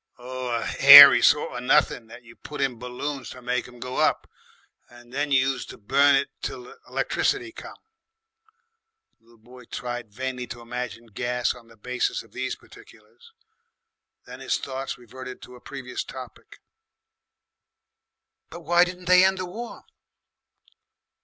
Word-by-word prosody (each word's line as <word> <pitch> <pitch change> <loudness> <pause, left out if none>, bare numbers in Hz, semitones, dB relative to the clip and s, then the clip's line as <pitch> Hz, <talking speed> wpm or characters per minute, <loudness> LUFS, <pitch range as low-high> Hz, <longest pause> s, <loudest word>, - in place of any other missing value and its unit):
"Oh, 125 0 -6
a - - -5
hairy 140 +1 +10
sort 150 - +2
of 120 - -5
nothin' 125 -2 +1
what 120 +2 -13
you 115 0 -16
put 150 - -10
in 130 -4 -1
balloons 125 +2 -6
to 125 - -11
make 125 0 -2
'em 125 -1 -15
go 125 +1 -6
up. - - +1 0.6
And 120 0 -17
you 140 -1 +1
used 135 0 -2
to - - -10
burn 140 +6 +3
it 140 +1 +1
till 370 - -6
the 445 +4 -15
'lectricity 370 -4 -1
come." - - -11 1.4
The 115 - -35
little 115 0 -23
boy 125 +2 -16
tried 120 -3 -6
vainly 125 +2 -5
to 120 0 -9
imagine 120 -1 -6
gas 120 +3 -2
on 120 -2 -16
the 115 -1 -19
basis 125 +4 -3
of - - -22
these - - -4
particulars. 470 0 -19 0.9
Then - - -11
his - - -1
thoughts 135 0 -6
reverted 125 +1 -10
to 125 - -12
a 125 - -16
previous 135 -3 -7
topic. 130 -3 -12 1.9
"But 170 - -10
why 175 +2 +4
didn't 180 0 -6
they 180 +1 +6
end 190 0 +3
the 185 - -4
War?" 230 +7 -9
125 Hz, 155 wpm, -24 LUFS, 120-145 Hz, 1.9 s, hairy